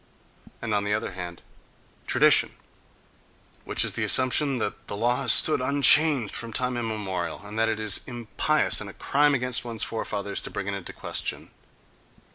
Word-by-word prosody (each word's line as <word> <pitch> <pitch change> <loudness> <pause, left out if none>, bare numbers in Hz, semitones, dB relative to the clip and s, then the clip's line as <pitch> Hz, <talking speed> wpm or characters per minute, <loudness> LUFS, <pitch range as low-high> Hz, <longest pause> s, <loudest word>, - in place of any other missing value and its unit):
and 110 -2 -3
on 100 -1 0
the 105 +1 -1
other 110 - -5
hand, 90 -2 -9 0.6
tradition, - - +4 1.1
which - - +1
is - - -1
the - - -3
assumption 130 +2 +2
that 105 -3 -4
the 100 - -5
law 120 +4 0
has 125 - +2
stood 155 - +4
unchanged 140 -2 +4
from 115 -1 -6
time 125 +2 -2
immemorial, 100 -7 -5
and 105 +2 -7
that 115 0 +1
it 110 -1 -3
is 105 -3 +1
impious 120 -3 0
and - - -8
a - - -12
crime 145 +1 +1
against 125 -1 +1
one's 115 -2 -2
forefathers 100 -3 -4
to - - -8
bring 100 - -6
it 100 - -4
into 100 -2 -8
question. - - -5
115 Hz, 170 wpm, -24 LUFS, 100-125 Hz, 1.1 s, tradition